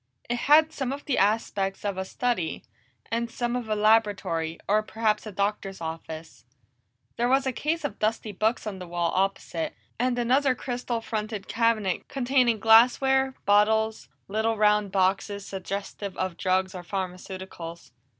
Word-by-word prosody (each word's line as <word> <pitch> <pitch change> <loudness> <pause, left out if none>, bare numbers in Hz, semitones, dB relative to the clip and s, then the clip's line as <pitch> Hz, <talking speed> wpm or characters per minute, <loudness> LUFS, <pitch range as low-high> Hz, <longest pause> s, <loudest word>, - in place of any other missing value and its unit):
It 240 - 0
had 310 +5 +5
some 265 -2 -2
of 280 +1 -6
the 275 - +1
aspects 200 -1 0
of 200 -1 -1
a 190 0 -3
study, 195 -6 -2 0.5
and 235 +1 -1
some 240 +1 -2
of 240 -3 -4
a 215 - +1
laboratory, 205 -7 +2
or 210 +2 +3
perhaps 215 0 -1
a - - -5
doctor's 200 0 -2
office. 160 -3 -7 0.7
There 240 +1 +1
was 270 +1 +3
a 265 - +1
case 310 +6 -2
of 290 - -4
dusty 215 0 -1
books 215 +5 0
on 200 -3 -5
the 180 - -8
wall 170 -1 -1
opposite, 190 -3 -1 0.2
and 250 0 +1
another 255 +3 +3
crystal 245 -1 -3
fronted 215 -2 -4
cabinet 225 -5 +1
containing 250 -4 +2
glassware, 260 +4 +5
bottles, 220 +2 +3 0.2
little 220 +2 0
round 210 -1 +3
boxes 195 +1 0
suggestive 195 0 -5
of 185 -2 -2
drugs 185 +1 0
or 180 - -6
pharmaceuticals. 185 -3 -6
215 Hz, 150 wpm, -26 LUFS, 190-240 Hz, 0.7 s, had